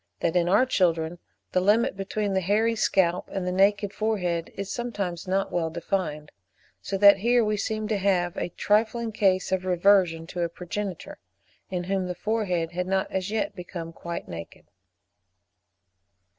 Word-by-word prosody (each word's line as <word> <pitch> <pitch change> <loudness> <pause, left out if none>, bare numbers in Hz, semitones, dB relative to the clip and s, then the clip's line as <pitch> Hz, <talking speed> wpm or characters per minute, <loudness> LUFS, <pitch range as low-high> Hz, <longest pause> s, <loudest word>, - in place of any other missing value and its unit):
51.) 165 - +1
that 180 - +4
in 175 0 0
our 205 +7 +5
children 170 -7 +1 0.3
the 185 - +2
limit 220 +6 +3
between 200 +1 -2
the 190 - +1
hairy 215 +5 +2
scalp 185 -5 +1
and 190 -2 -3
the 180 - -1
naked 200 +2 +2
forehead 180 -6 -1
is 200 0 -5
sometimes 200 -8 -4
not 195 +1 0
well 165 -2 0
defined; 160 -3 -3 0.5
so 195 - -3
that 200 0 +8
here 235 +3 +3
we 210 0 +1
seem 215 +1 -2
to 215 -1 0
have 180 -3 +1
a - - -3
trifling 225 +5 +1
case 190 -3 +1
of 190 -1 0
reversion 180 -2 +3
to 175 +1 -5
a 170 - 0
progenitor, 180 +2 -6 0.5
in 180 -2 -2
whom 190 0 -1
the 180 - -4
forehead 185 -6 -1
had 180 +1 -3
not 190 0 0
as 190 0 -2
yet 210 -2 -2
become 170 -2 -7
quite 170 +1 -6
naked. 85 -1 -9
190 Hz, 170 wpm, -26 LUFS, 175-205 Hz, 0.5 s, that